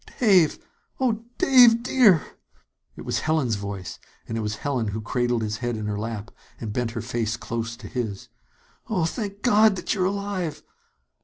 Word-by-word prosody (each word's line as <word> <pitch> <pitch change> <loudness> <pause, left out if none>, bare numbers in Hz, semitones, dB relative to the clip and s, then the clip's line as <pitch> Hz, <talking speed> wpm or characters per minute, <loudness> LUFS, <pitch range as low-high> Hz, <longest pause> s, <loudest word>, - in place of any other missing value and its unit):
"Dave! 190 -9 +5 0.4
Oh, 230 -3 0
Dave, 240 -3 +6
dear!" 230 - +5 0.7
It - - -9
was - - -1
Helen's 155 -7 0
voice, 100 -2 -5 0.3
and 115 - -4
it 115 - -1
was 105 0 -2
Helen 130 -3 -2
who 105 +2 -3
cradled 120 +1 -1
his 105 0 -2
head 120 -1 -3
in 110 - -4
her 105 -1 -2
lap 110 -1 -5 0.3
and 110 -3 -5
bent 120 0 -1
her - - -2
face 115 -2 -2
close 115 0 -4
to 115 -4 -10
his. 110 -4 -4 0.6
"Oh, 180 -7 0
thank 200 +3 -4
God 215 -3 +5
that - - -2
you're 190 -4 0
alive 195 -5 -3
125 Hz, 170 wpm, -24 LUFS, -, 0.7 s, Dave